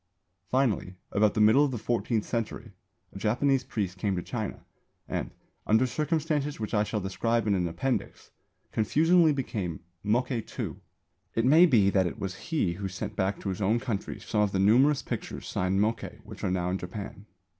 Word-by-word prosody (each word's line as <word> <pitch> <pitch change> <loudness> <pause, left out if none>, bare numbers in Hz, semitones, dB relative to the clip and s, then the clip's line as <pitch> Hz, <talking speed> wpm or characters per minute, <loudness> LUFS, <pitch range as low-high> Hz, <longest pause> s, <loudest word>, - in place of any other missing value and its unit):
Finally, 115 -8 +1 0.2
about 105 +1 +3
the - - +1
middle 110 +7 +6
of 145 - +2
the 125 - -3
fourteenth 115 -1 -1
century, 115 -3 -3 0.4
a 95 - -7
Japanese 125 +5 +2
priest 100 -7 -3
came 100 0 0
to 90 - -3
China - - -5 0.4
and, - - -3 0.4
under 110 +4 +4
circumstances 150 0 -1
which 110 - -4
I 105 -1 +3
shall 105 +1 -2
describe 115 +4 0
in 105 - +2
an 90 -3 +1
appendix, 85 +11 -3 0.4
confusingly 160 +9 +4
became 105 - -3 0.2
Mokkei 120 +3 +1 0.2
II. - - -3 0.6
It 115 - +2
may 160 +7 +7
be 105 - +4
that 95 -2 +3
it 95 - -5
was 95 -4 -4
he 145 - +1
who 95 +2 -4
sent 100 +3 -5
back 95 0 0
to 100 - -3
his 95 +2 -3
own 110 +5 +2
country 115 -5 -4
some 105 - -1
of 105 -2 +1
the - - +1
numerous 125 +9 +4
pictures - - -5
signed 95 +1 0
Mokkei 110 +3 -1
which - - -11
are - - +1
now 90 -1 0
in 95 - -1
Japan. 100 +2 -7
110 Hz, 185 wpm, -28 LUFS, 95-130 Hz, 0.6 s, may